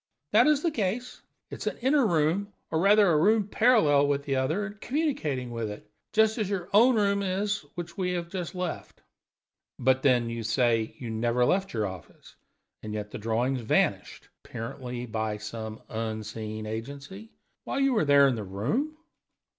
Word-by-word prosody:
"That 230 +6 +6
is 300 -1 +3
the 335 - +2
case. 235 +1 -3 0.3
It - - -6
is - - -5
an - - -2
inner 265 0 +3
room, 170 +4 +1 0.2
or, 160 - +1
rather, 200 +1 +5
a 155 - +4
room 210 +4 +3
parallel 180 - +4
with 140 0 0
the 140 -1 -1
other, 155 +10 0
and 210 0 -10
communicating 155 - -1
with 115 -2 -3
it; 105 0 -10 0.2
just 220 +1 +3
as 210 -3 -1
your 190 -3 -3
own 235 +5 +6
room 200 -2 +2
is, 200 +2 -1
which 175 +3 -7
we 180 -1 0
have 175 -1 -3
just 180 -2 -5
left." 180 -3 -5 0.7
"But, 130 +1 +2
then, 125 -4 +3
you 115 0 -4
say 115 0 +1
you 120 -3 -6
never 120 +2 +1
left 190 +7 +1
your 110 -2 -1
office, 95 -4 -10 0.5
and 105 0 -6
yet 105 0 -5
the - - -6
drawings 120 +4 0
vanished 110 - 0 0.2
apparently 125 +2 -6
by 110 -2 -2
some 110 +1 -7
unseen 110 -1 -5
agency 140 - -7 0.3
while - - -3
you 275 -1 +3
were 210 -9 +2
there 140 -1 +6
in 135 - +2
the 110 -3 -4
room?" 145 - -2
145 Hz, 180 wpm, -27 LUFS, -, 0.7 s, That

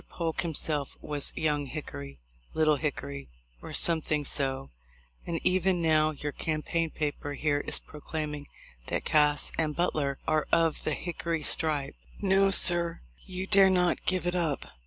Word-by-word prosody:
Polk 165 -2 -3
himself 155 -3 -1
was 145 -2 0
'Young 150 -2 -1
Hickory,' 70 - -8 0.4
'Little 155 -2 +3
Hickory,' 70 - -5 0.3
or - - -9
something 155 -3 +2
so; 135 -1 -2 0.6
and 165 -1 -2
even 185 0 +1
now 155 -2 +2
your 145 -1 -5
campaign 160 +2 -2
paper 145 -1 -4
here 145 +1 0
is - - +3
proclaiming 150 -1 -7 0.4
that - - -3
Cass 150 -1 +2
and 155 -2 -1
Butler 145 -6 -1
are 155 -1 +1
of 165 -2 +1
the 155 - -1
'Hickory 170 -2 -4
stripe.' 145 -3 +3 0.3
No, 195 0 +3
sir, 175 -3 +6 0.3
you 185 0 -4
dare 195 -1 +5
not 180 -1 0
give 185 -1 0
it 175 - -1
up. 165 -6 -2
155 Hz, 145 wpm, -28 LUFS, 145-170 Hz, 0.6 s, sir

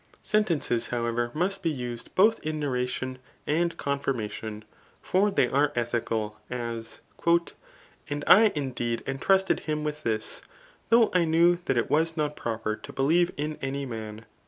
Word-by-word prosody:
Sen^* 215 0 +2
fences, 120 -8 0
however, 120 0 -1
must 195 +4 0
be 170 - +1
used 125 -5 -5
both 220 +4 +5
in 155 0 -3
narration 130 -2 -2 0.3
and 170 +3 0
com 140 0 -1
firmation; 110 -5 -4 0.4
for 195 +3 +2
they 195 -11 +2
are 140 +3 +2
ethical 115 -3 -2
\ - - -35
as, 115 -2 -5
'* - - -22 0.8
And 145 0 -3
I 215 +2 +7
indeed 120 -5 -2
en 135 0 -3
^ - - -19
trusted 190 0 +3
him 150 0 -1
with 150 0 -3
this, 110 -5 -3 0.5
though 230 -1 +5
I 180 -2 +4
knew 170 +2 +4
that 135 - +1
it 120 - 0
was 165 +2 +2
not 150 -1 -1
pfo« 115 -1 -4
per 110 - 0
to - - -10
believe 165 +6 +3
in 150 +1 -3
any 135 +1 -3
man.' 110 -2 -7
140 Hz, 175 wpm, -27 LUFS, 120-165 Hz, 0.8 s, I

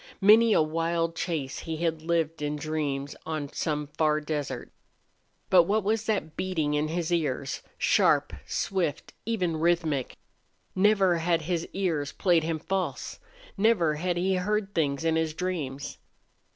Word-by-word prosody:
Many 220 +3 +6
a 160 - +5
wild 165 +1 -1
chase 155 -7 -3
he 160 -1 -4
had 165 -1 -1
lived 165 -1 -1
in 150 0 -1
dreams 145 -2 -3
on 155 -3 -4
some 150 -1 -1
far 150 +1 +1
desert. 150 -2 -4 0.8
But 180 -3 +7
what 210 +3 +1
was 220 +2 0
that 195 -8 -1
beating 160 -6 -1
in 150 +1 +1
his 170 +1 -2
ears 140 -5 -1 0.2
sharp, - - +3
swift, 170 -6 -2
even, 180 -8 0
rhythmic? 160 -5 0 0.6
Never 190 -3 +4
had 165 -1 +1
his 170 0 -2
ears 160 -7 -1
played 175 -4 +3
him 160 0 -1
false. 190 +4 -3 0.4
Never 195 -7 +3
had 175 +3 -1
he 190 +2 +1
heard 200 +2 -1
things 145 -1 0
in 160 0 +2
his 160 -1 -1
dreams. 150 -6 -4
165 Hz, 145 wpm, -27 LUFS, 150-185 Hz, 0.8 s, But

